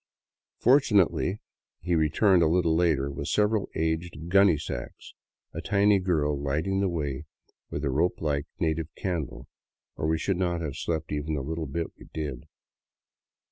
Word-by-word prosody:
Fortunately 105 Hz, -, +3 dB, 0.4 s
he 85 Hz, +4 st, -2 dB
returned 85 Hz, +4 st, +4 dB
a 80 Hz, -, +5 dB
little 80 Hz, -1 st, +2 dB
later 80 Hz, -5 st, +2 dB
with 70 Hz, +1 st, -5 dB
several 105 Hz, 0 st, +1 dB
aged 80 Hz, 0 st, -2 dB
gunny 95 Hz, -3 st, +5 dB
sacks, 70 Hz, -5 st, -7 dB, 0.4 s
a 80 Hz, -, -4 dB
tiny 100 Hz, +2 st, +3 dB
girl 80 Hz, -6 st, +1 dB
lighting 80 Hz, +8 st, 0 dB
the 100 Hz, -1 st, +1 dB
way 75 Hz, -4 st, -3 dB, 0.4 s
with 70 Hz, -, -3 dB
a 70 Hz, -, 0 dB
rope 80 Hz, +7 st, +1 dB
like 70 Hz, -2 st, -1 dB
native 80 Hz, -1 st, 0 dB
candle, 75 Hz, -9 st, -4 dB, 0.5 s
or 75 Hz, -, -1 dB
we 80 Hz, 0 st, +2 dB
should 95 Hz, +3 st, -1 dB
not 90 Hz, -2 st, 0 dB
have 75 Hz, -5 st, -4 dB
slept 80 Hz, -2 st, -3 dB
even 75 Hz, +1 st, -2 dB
the 70 Hz, -, -3 dB, 0.3 s
bit 85 Hz, +4 st, -4 dB
we -, -, -13 dB
did. 75 Hz, -6 st, -4 dB
80 Hz, 150 wpm, -27 LUFS, 75-90 Hz, 0.5 s, a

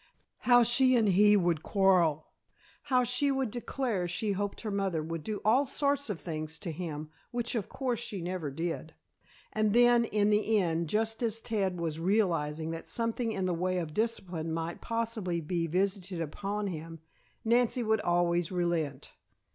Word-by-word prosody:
How 245 Hz, 0 st, +8 dB
she 255 Hz, +2 st, +4 dB
and 220 Hz, -4 st, +3 dB
he 205 Hz, +2 st, +6 dB
would 175 Hz, -4 st, +1 dB
quarrel, 180 Hz, -7 st, +3 dB, 0.6 s
how 255 Hz, -3 st, +3 dB
she 250 Hz, +4 st, +1 dB
would 265 Hz, -4 st, 0 dB
declare 240 Hz, -5 st, -2 dB
she 180 Hz, +5 st, -1 dB
hoped 200 Hz, +1 st, -3 dB
her 215 Hz, -, -4 dB
mother 195 Hz, -5 st, -1 dB
would 165 Hz, 0 st, -5 dB
do 215 Hz, +3 st, -3 dB
all 240 Hz, +6 st, +5 dB
sorts 285 Hz, -1 st, 0 dB
of 195 Hz, -5 st, -3 dB
things 155 Hz, -1 st, -5 dB
to 175 Hz, -1 st, -5 dB
him 155 Hz, -2 st, -5 dB, 0.2 s
(which, 240 Hz, -1 st, -2 dB
of 220 Hz, -6 st, -2 dB
course, 250 Hz, -4 st, -2 dB
she 210 Hz, -4 st, -5 dB
never 175 Hz, -3 st, -3 dB
did), 165 Hz, +2 st, -4 dB, 0.6 s
and 215 Hz, -1 st, +1 dB
then 240 Hz, 0 st, +5 dB
in 210 Hz, -1 st, +1 dB
the 215 Hz, +1 st, +3 dB
end, 170 Hz, -4 st, 0 dB
just 225 Hz, +3 st, 0 dB
as 225 Hz, -2 st, 0 dB
Ted 195 Hz, -6 st, -1 dB
was 165 Hz, -2 st, -2 dB
realizing 165 Hz, -5 st, 0 dB
that 165 Hz, 0 st, -6 dB
something 230 Hz, 0 st, -1 dB
in 190 Hz, -3 st, -2 dB
the 180 Hz, -, 0 dB
way 185 Hz, +2 st, -1 dB
of 165 Hz, -4 st, -3 dB
discipline 180 Hz, -7 st, -1 dB
might 165 Hz, +1 st, -3 dB
possibly 230 Hz, -6 st, -2 dB
be 165 Hz, +1 st, -2 dB
visited 190 Hz, +1 st, -1 dB
upon 200 Hz, +6 st, -3 dB
him, 165 Hz, -3 st, -6 dB, 0.5 s
Nancy 240 Hz, +1 st, +3 dB
would 220 Hz, -1 st, +1 dB
always 175 Hz, 0 st, +1 dB
relent. 170 Hz, -6 st, -2 dB
195 Hz, 170 wpm, -30 LUFS, 165-225 Hz, 0.6 s, How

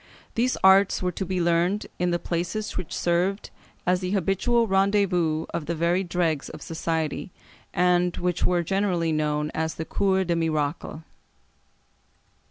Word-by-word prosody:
These 250 Hz, +3 st, +1 dB
arts 190 Hz, 0 st, +5 dB
were 180 Hz, -, +1 dB
to 190 Hz, -, -4 dB
be 185 Hz, 0 st, -1 dB
learned 175 Hz, +4 st, +1 dB
in 180 Hz, 0 st, +1 dB
the 175 Hz, -, +1 dB
places 180 Hz, +6 st, -3 dB
which 180 Hz, -, -5 dB
served 180 Hz, +4 st, 0 dB, 0.3 s
as 180 Hz, 0 st, +2 dB
the 180 Hz, 0 st, -3 dB
habitual 200 Hz, +5 st, +2 dB
rendezvous 190 Hz, -5 st, +2 dB
of 155 Hz, -, -3 dB
the 170 Hz, -, -1 dB
very 170 Hz, +3 st, +1 dB
dregs 170 Hz, -5 st, -1 dB
of -, -, -9 dB
society, 160 Hz, +2 st, -3 dB, 0.4 s
and 180 Hz, 0 st, +2 dB
which 180 Hz, -1 st, -1 dB
were 175 Hz, -1 st, +2 dB
generally 180 Hz, -3 st, 0 dB
known 150 Hz, -1 st, 0 dB
as 160 Hz, 0 st, -2 dB
the 160 Hz, -, -4 dB
Cours 190 Hz, 0 st, +1 dB
des 175 Hz, -, 0 dB
Miracles. 155 Hz, -1 st, -2 dB
175 Hz, 150 wpm, -25 LUFS, 165-190 Hz, 0.4 s, arts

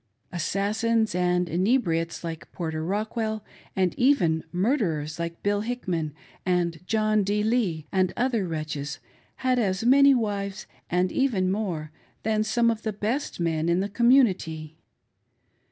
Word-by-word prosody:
Assassins 215 Hz, +5 st, 0 dB
and 180 Hz, 0 st, +1 dB
inebriates 170 Hz, -3 st, 0 dB
like 165 Hz, -1 st, -6 dB
Porter 160 Hz, -2 st, -3 dB
Rockwell, 215 Hz, +3 st, -2 dB, 0.3 s
and 185 Hz, -3 st, +2 dB
even 180 Hz, -, +3 dB
murderers 175 Hz, -, 0 dB
like 170 Hz, 0 st, -5 dB
Bill 205 Hz, 0 st, +1 dB
Hickman 180 Hz, -, -3 dB, 0.3 s
and 175 Hz, -3 st, 0 dB
John 215 Hz, -1 st, +2 dB
D. 205 Hz, +2 st, 0 dB
Lee, 210 Hz, -9 st, 0 dB
and 185 Hz, -1 st, +2 dB
other 240 Hz, -6 st, +1 dB
wretches, 150 Hz, -3 st, -4 dB, 0.5 s
had 255 Hz, -1 st, +3 dB
as 195 Hz, -3 st, 0 dB
many 275 Hz, +3 st, +6 dB
wives, 200 Hz, -4 st, -2 dB, 0.2 s
and 180 Hz, +1 st, +1 dB
even 205 Hz, -9 st, +1 dB
more, 175 Hz, -7 st, -3 dB, 0.3 s
than 215 Hz, 0 st, +1 dB
some 230 Hz, +2 st, +2 dB
of 225 Hz, -1 st, -4 dB
the 220 Hz, -, -2 dB
best 220 Hz, +7 st, -2 dB
men 165 Hz, -1 st, 0 dB
in 170 Hz, +1 st, +3 dB
the 200 Hz, +2 st, -1 dB
community. 195 Hz, -, +2 dB
195 Hz, 135 wpm, -26 LUFS, 170-220 Hz, 0.5 s, many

